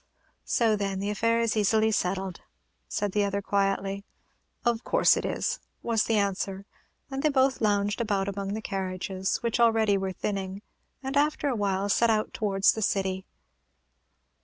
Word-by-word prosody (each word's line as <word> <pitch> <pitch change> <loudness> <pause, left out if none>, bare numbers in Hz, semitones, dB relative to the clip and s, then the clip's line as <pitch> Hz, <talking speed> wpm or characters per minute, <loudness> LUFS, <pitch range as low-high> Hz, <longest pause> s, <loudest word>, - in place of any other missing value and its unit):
"So, 225 -2 +2
then, 200 -2 -2
the 200 +1 -1
affair 230 +3 +1
is 230 -1 +1
easily 220 +1 +3
settled," 190 -2 -1 0.5
said 205 -2 -2
the 205 +1 +2
other, 200 0 0
quietly. 195 0 0 0.6
"Of 235 -1 +1
course - - +4
it - - -2
is," - - -1 0.2
was 230 -2 +1
the 225 - +1
answer; 200 -1 -1 0.5
and 270 0 -2
they 305 - +3
both 265 -2 +2
lounged 205 +1 +1
about 200 -4 0
among 200 0 -3
the 220 - -5
carriages, 190 -1 -2
which 235 0 0
already 225 -4 +4
were 190 0 -2
thinning, 195 +1 -4 0.4
and, 265 +1 -3
after 295 0 +2
a 255 - 0
while, 200 -2 0
set 230 +3 +3
out 215 -1 +1
towards 195 -2 +3
the 220 - -4
city. 190 -2 -1
205 Hz, 160 wpm, -27 LUFS, 195-225 Hz, 0.6 s, course